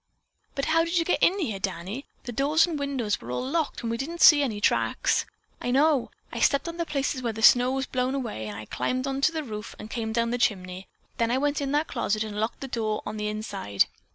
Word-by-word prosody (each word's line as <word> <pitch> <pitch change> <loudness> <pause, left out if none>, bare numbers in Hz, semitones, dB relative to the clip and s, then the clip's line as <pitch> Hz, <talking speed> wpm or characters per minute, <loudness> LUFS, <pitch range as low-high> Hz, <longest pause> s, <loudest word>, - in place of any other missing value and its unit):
"But 275 - -1
how 330 +1 +3
did 335 +1 -1
you 330 - +2
get 360 - +1
in 375 - +4
here, 225 - -2
Danny? 195 +6 -4 0.2
The 245 - -5
doors 285 +6 +3
and 330 -4 -4
windows 265 -7 -1
were 115 - -9
all 125 - -2
locked 315 -2 -1
and 230 - -1
we 230 - -1
didn't 325 +6 -5
see 300 -2 +9
any 230 -7 -1
tracks." - - +1 0.3
"I - - -2
know! 280 0 +3 0.2
I - - -4
stepped 280 +3 +2
on 335 0 -5
the 335 -1 -2
places 275 -2 -1
where 235 -2 -2
the 220 +1 -5
snow 245 +2 +7
was 270 0 -1
blown 255 +1 -1
away 225 - -4
and 105 -1 -6
I 105 - -7
climbed 255 - -2
to 275 +3 +1
the 320 -2 -3
roof 215 -4 -7
and 215 - -9
came 225 -2 -3
down 230 +1 0
the 245 - -1
chimney. 185 -6 -1 0.3
Then 230 -1 +2
I 245 - +2
went 290 +1 0
in 275 -1 -2
that 300 +2 +2
closet 215 +1 -1
and 210 -1 -5
locked 220 +2 -2
the 270 - -4
door 220 -4 -2
on 215 +1 -5
the 210 0 -2
inside. 205 - 0
250 Hz, 245 wpm, -26 LUFS, 215-285 Hz, 0.3 s, see